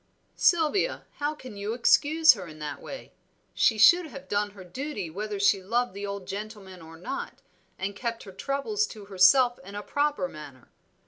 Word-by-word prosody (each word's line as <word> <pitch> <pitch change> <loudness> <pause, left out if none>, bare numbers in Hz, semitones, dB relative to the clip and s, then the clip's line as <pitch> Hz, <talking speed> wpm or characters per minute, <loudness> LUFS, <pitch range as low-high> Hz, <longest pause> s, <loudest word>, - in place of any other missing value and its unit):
"Sylvia, 345 +8 +2
how 295 +1 -1
can 255 -7 -11
you 205 +3 -3
excuse 310 +5 +5
her 190 -6 -8
in 155 -1 -11
that 150 -2 -6
way? - - -9 0.4
She 225 - +3
should 345 +11 +6
have 275 -2 -11
done 205 0 0
her 190 - -9
duty 205 - -5
whether 205 +3 -4
she 200 0 +3
loved 235 +4 -1
the 200 +1 -5
old 200 -1 -5
gentleman 200 -3 -7
or 165 0 -12
not, 175 - -6 0.3
and 195 +1 -4
kept 230 +1 -4
her 195 - -10
troubles 280 - -1
to 210 -3 -11
herself 205 +6 +5
in 200 +2 -10
a 205 - -5
proper 285 -9 0
manner. 145 -6 -12
210 Hz, 180 wpm, -27 LUFS, 190-275 Hz, 0.4 s, should